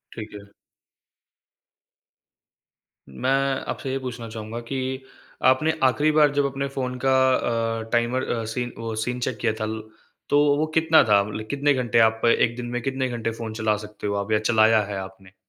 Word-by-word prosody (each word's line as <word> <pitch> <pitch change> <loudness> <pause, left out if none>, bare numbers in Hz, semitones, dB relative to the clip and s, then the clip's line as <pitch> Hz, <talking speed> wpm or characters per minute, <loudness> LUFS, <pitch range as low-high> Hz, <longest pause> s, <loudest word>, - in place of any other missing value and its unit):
ठीक 110 -2 -8
है। 100 0 -12 2.6
मैं 130 - -2 0.4
आपसे 135 - -4
ये 135 - -1
पूछना 125 -3 -6
चाहूँगा 110 +1 -6
कि 135 - -2 0.7
आपने 130 +5 +4
आखिरी 145 +4 +3
बार 150 -2 +4
जब 145 0 +2
अपने 140 0 -2
फ़ोन 125 -1 -2
का 130 - +4 0.2
अ, 115 -1 -1
टाइमर 120 +2 +1
अ, 115 -1 -1
सीन 120 +2 -3
वो 115 -1 -4
सीन 125 +3 -2
चेक 125 -2 -2
किया 115 -2 +1
था 110 - -1
ल 110 0 -4 0.5
तो 145 - +4 0.2
वो 155 - +1
कितना 160 0 +5
था? 105 -3 +4
मतलब 110 +1 -6
कितने 140 0 +2
घंटे 120 -3 +1
आप 110 0 +3
1 115 0 +3
दिन 125 - -5
में 120 - -1
कितने 130 +1 -1
घंटे 115 -1 -3
फ़ोन 115 -1 -6
चला 110 -1 0
सकते 105 0 -7
हो 100 - -1
आप 100 +2 -3
या 105 - +3
चलाया 110 0 +4
है 100 -1 -5
आपने? 95 0 -11
115 Hz, 180 wpm, -24 LUFS, 110-130 Hz, 2.6 s, कितना